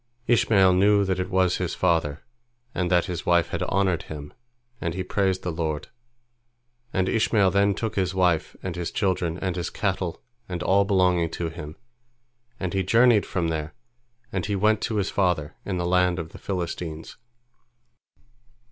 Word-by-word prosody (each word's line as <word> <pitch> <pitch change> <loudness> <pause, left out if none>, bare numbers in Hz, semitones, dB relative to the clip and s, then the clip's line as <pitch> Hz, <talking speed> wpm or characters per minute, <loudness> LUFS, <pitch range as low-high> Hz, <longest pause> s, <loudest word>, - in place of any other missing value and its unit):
Ishmael 100 -6 +4
knew 100 +2 +4
that 95 -1 -1
it 90 +1 -2
was 95 -1 +2
his 90 -2 -2
father, 80 -4 0 0.5
and 90 -1 -1
that 90 -1 +3
his 90 -2 -4
wife 85 -2 +3
had - - -3
honored 95 -3 +1
him, 75 -1 -9 0.5
and 85 0 -2
he 95 - -2
praised 95 0 0
the 90 - -2
Lord. 80 -2 -3 1.0
And 95 0 0
Ishmael 105 -3 +3
then 100 0 +3
took 110 0 -4
his 95 -1 0
wife 90 -4 +1
and 95 -2 -4
his 85 -1 -3
children 90 -7 -1
and 95 -2 -2
his 90 -2 -3
cattle 95 -4 -2 0.3
and 90 -1 -3
all 100 +1 +3
belonging 90 -4 +2
to 85 -1 -2
him, 80 -2 -8 0.8
and 95 -2 -3
he 95 - +1
journeyed 115 +3 +4
from 85 -3 -1
there, 80 0 -4 0.6
and 95 -5 -2
he 105 - 0
went 105 +2 +2
to 115 - -3
his 100 -2 0
father 90 -6 0
in 95 -2 -2
the 90 - -1
land 90 0 +2
of 80 -2 -5
the - - -11
Philistines. 85 -4 -5
90 Hz, 170 wpm, -25 LUFS, 85-95 Hz, 1.0 s, Ishmael